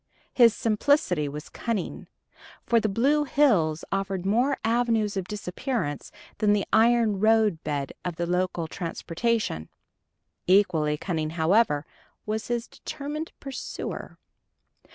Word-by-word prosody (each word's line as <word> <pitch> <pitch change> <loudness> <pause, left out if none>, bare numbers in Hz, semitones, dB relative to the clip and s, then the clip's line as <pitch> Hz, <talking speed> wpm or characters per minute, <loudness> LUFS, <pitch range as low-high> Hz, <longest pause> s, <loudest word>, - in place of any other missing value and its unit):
His 235 -3 +6
simplicity 215 - +1
was 150 +1 -7
cunning, 225 -6 -4 0.6
for 235 - +4
the 215 - 0
blue 275 +9 +2
hills 205 - +2
offered 195 -2 -2
more 245 +8 +2
avenues 225 -2 +1
of 190 -2 -3
disappearance 205 - -3 0.3
than 210 -2 +4
the 205 -1 +1
iron 225 -3 +4
roadbed 190 -10 +1
of 175 -2 -3
the 170 - -2
local 180 -1 -1
transportation. 170 - -2 0.8
Equally 165 -6 +3
cunning, 160 -2 -2
however, 160 -1 +2 0.4
was 215 0 -3
his 240 0 -2
determined 305 +2 -6
pursuer. 275 -2 -6
205 Hz, 110 wpm, -26 LUFS, 170-235 Hz, 0.8 s, His